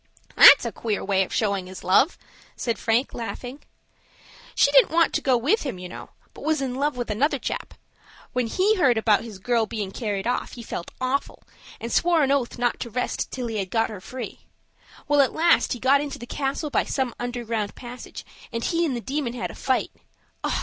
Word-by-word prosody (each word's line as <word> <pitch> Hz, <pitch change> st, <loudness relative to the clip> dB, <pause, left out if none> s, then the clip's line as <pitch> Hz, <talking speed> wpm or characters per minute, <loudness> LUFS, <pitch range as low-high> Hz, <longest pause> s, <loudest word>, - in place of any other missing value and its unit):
"That's -, -, +9 dB
a -, -, -2 dB
queer 215 Hz, -3 st, -3 dB
way 195 Hz, -1 st, +2 dB
of -, -, -8 dB
showing 200 Hz, -4 st, 0 dB
his 185 Hz, 0 st, -10 dB
love," 265 Hz, -, +3 dB, 0.4 s
said 235 Hz, -2 st, -2 dB
Frank, 230 Hz, +4 st, +1 dB
laughing. 245 Hz, +3 st, -6 dB, 0.9 s
"She 280 Hz, -, +4 dB
didn't 275 Hz, -2 st, +6 dB
want 335 Hz, +1 st, +3 dB
to -, -, 0 dB
go 260 Hz, -2 st, +3 dB
with 295 Hz, -, +2 dB
him, 265 Hz, -10 st, -4 dB
you 180 Hz, 0 st, -7 dB
know, -, -, -9 dB, 0.2 s
but -, -, -12 dB
was 315 Hz, 0 st, +1 dB
in 265 Hz, -2 st, -2 dB
love 280 Hz, +1 st, -1 dB
with 240 Hz, -3 st, -3 dB
another 280 Hz, +7 st, +1 dB
chap. -, -, -5 dB, 0.6 s
When 250 Hz, -2 st, 0 dB
he 400 Hz, -, +2 dB
heard 260 Hz, -10 st, +4 dB
about 220 Hz, -2 st, +3 dB
his 220 Hz, -4 st, -9 dB
girl 230 Hz, +3 st, 0 dB
bein' 205 Hz, -3 st, -4 dB
carried 205 Hz, -3 st, -3 dB
off, 245 Hz, +1 st, -1 dB
he 235 Hz, -, -8 dB
felt 175 Hz, -, -6 dB
awful, 255 Hz, +2 st, -2 dB, 0.4 s
and 230 Hz, -, -5 dB
swore 340 Hz, -3 st, +3 dB
an 275 Hz, -, +2 dB
oath 270 Hz, -4 st, 0 dB
not 245 Hz, 0 st, 0 dB
to 235 Hz, -, -5 dB
rest 250 Hz, +3 st, -2 dB
till 255 Hz, -2 st, -4 dB
he 225 Hz, -2 st, -3 dB
had 195 Hz, -2 st, -2 dB
got 225 Hz, +2 st, 0 dB
her 205 Hz, -3 st, -8 dB
free. 255 Hz, +5 st, -8 dB, 0.6 s
Well, 290 Hz, 0 st, +5 dB
at 270 Hz, -, +1 dB
last 335 Hz, +1 st, +3 dB
he 245 Hz, -, -6 dB
got 275 Hz, +3 st, +4 dB
into 290 Hz, -1 st, -5 dB
the 240 Hz, -, -8 dB
castle 280 Hz, +4 st, -3 dB
by -, -, +2 dB
some 260 Hz, -4 st, -1 dB
underground 235 Hz, -4 st, -3 dB
passage, 245 Hz, 0 st, -9 dB, 0.3 s
and 230 Hz, 0 st, -3 dB
he 340 Hz, 0 st, +1 dB
and 265 Hz, -, -2 dB
the 240 Hz, -, -4 dB
Demon 265 Hz, -1 st, -3 dB
had 245 Hz, -, -4 dB
a -, -, -11 dB
fight. 260 Hz, -1 st, -1 dB
245 Hz, 210 wpm, -24 LUFS, 225-280 Hz, 0.9 s, That's